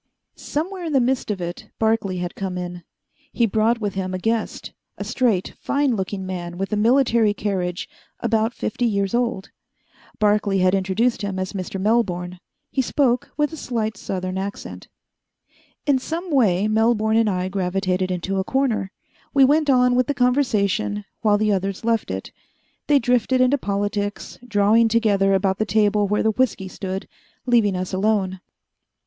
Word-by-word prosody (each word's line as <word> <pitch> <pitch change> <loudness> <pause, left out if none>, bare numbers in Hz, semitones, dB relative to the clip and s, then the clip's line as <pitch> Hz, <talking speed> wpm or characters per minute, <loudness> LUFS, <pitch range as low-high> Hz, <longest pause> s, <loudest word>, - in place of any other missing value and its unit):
Somewhere 360 +5 -4
in 320 - -3
the 270 - +5
midst 255 0 0
of 205 -2 -2
it, 175 0 -6
Barclay 220 -4 +1
had 175 0 -4
come 190 -2 -4
in. 175 0 -5 0.5
He 235 - +2
brought 225 +2 +1
with 205 -3 -2
him 185 -1 -3
a - - -1
guest 225 +4 -2 0.2
a - - -4
straight, 225 -8 0
fine 280 -3 +1
looking 190 -1 -3
man 175 -2 -5
with 195 +3 -3
a - - +3
military 230 -1 +3
carriage, 185 -4 -2 0.3
about 225 0 +1
fifty 240 +3 -1
years 200 -3 0
old. 235 -5 -1 0.7
Barclay 210 -1 +2
had 185 0 +3
introduced 195 +6 +1
him 200 -2 -3
as 185 +1 -3
Mr. 190 0 -4
Melbourne. 185 -4 0 0.3
He 265 - +1
spoke 250 -1 +1
with 295 +1 0
a - - -6
slight 220 -6 -2
southern 185 -1 -4
accent. 200 +1 -6 1.0
In 280 -3 +3
some 335 +6 -5
way 210 -8 +3
Melbourne 220 0 +2
and 225 -1 +3
I 185 -1 -1
gravitated 185 -1 -1
into 185 +2 -2
a - - 0
corner. 235 -5 0 0.4
We 275 -1 +7
went 295 +2 +3
on 250 -2 +4
with 250 0 +2
the 285 - -1
conversation 215 -6 +1 0.2
while 210 -2 +3
the 215 0 +1
others 195 +2 -2
left 230 -1 +1
it. - - -5 0.6
They 290 - +5
drifted 250 0 +2
into 255 +3 +3
politics, 205 0 -3
drawing 220 +1 +4
together 205 -4 +2
about 190 0 0
the - - +3
table 210 0 +2
where 210 +1 +1
the 220 - +3
whisky 210 -4 0
stood, 190 0 -5 0.4
leaving 230 -6 +3
us 185 +1 -4
alone. 190 -1 0
210 Hz, 165 wpm, -22 LUFS, 190-240 Hz, 1.0 s, We